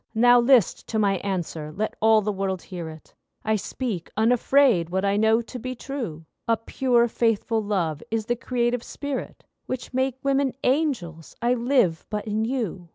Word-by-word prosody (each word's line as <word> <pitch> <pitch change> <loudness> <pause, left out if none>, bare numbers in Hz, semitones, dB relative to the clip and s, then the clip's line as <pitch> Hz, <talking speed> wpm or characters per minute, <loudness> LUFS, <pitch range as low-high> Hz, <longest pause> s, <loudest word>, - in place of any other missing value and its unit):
Now 245 +2 +6
list 240 -5 +3
to 220 - -2
my 200 -2 +2
answer—let 175 -1 -3
all 220 -1 +5
the 210 - 0
world 190 -2 -3
hear 175 -4 -6
it, 155 -1 -13 0.3
I 220 0 +2
speak 210 -3 -4
unafraid 235 -4 +3
what 190 +2 -1
I 200 0 +2
know 220 +2 +3
to 250 +2 -8
be 255 +2 -5
true— 230 - -6 0.2
A 230 -1 +3
pure, 240 +1 +2
faithful 225 -1 0
love 175 -8 -1
is 225 -1 -1
the 240 - 0
creative 240 -1 -1
spirit 285 +2 -6 0.2
Which 255 0 -5
make 260 0 0
women 275 -1 +1
angels! 250 - -1
I 240 +1 +2
live 240 - +1
but 210 -1 -3
in 215 +1 -1
you. 220 -9 -3
225 Hz, 165 wpm, -24 LUFS, 190-250 Hz, 0.3 s, Now